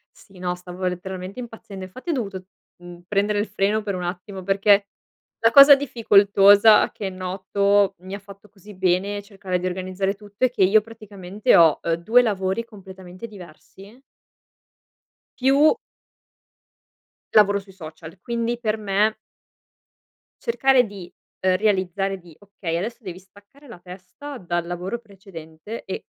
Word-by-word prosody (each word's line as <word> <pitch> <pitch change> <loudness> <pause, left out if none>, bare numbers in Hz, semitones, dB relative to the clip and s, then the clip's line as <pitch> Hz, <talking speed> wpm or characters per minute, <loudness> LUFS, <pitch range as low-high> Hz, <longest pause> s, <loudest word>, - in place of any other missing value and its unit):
Sì, 195 -2 -18
no, 180 0 -2
stavo 180 +1 -8
letteralmente 185 +3 -6
impazzendo. 220 -5 -9
Infatti 255 - -10
ho - - +2
dovuto, 200 -8 -4 0.3
mhmm, 175 0 -12
prendere 205 +1 0
il 210 - -1
freno 205 +2 0
per 200 -2 -3
un 180 - -5
attimo. 185 +2 -6
Perché 200 +1 +3 0.5
la 230 - +3
cosa 280 +2 +10
difficoltosa 205 -5 +5
che 200 -3 -5
noto, 190 +2 0
mi 190 +2 -8
ha - - -8
fatto 200 +1 -15
così 205 +1 -15
bene 190 +2 0
cercare 195 -3 -4
di 180 - -5
organizzare 185 +2 -3
tutto, 205 +4 -3
è - - +2
che 240 -5 0
io 205 +4 +5
praticamente 210 -3 -2
ho, 165 -3 +5
ehm, 165 - 0
due 220 +9 +3
lavori 195 0 -1
completamente 190 -2 -11
diversi 195 +3 -15 1.4
Più 275 +4 +4 1.6
lavoro 205 -1 +5
sui 195 -1 -16
social, 160 -2 -11
quindi 235 0 -2
per 220 -2 -1
me 210 +1 0 1.3
cercare 270 - +3
di, 200 -4 -11 0.3
ehm, 185 0 +2
realizzare 195 -1 0
di: 170 -3 -17
okay, 195 -4 -5
adesso 220 +7 -5
devi 185 -5 -8
staccare 205 +9 -21
la 235 -8 -12
testa, 185 +11 -10
dal 175 -4 -3
lavoro 180 +6 -4
precedente 195 -2 -11
e 190 - -6
195 Hz, 140 wpm, -22 LUFS, 185-215 Hz, 1.6 s, cosa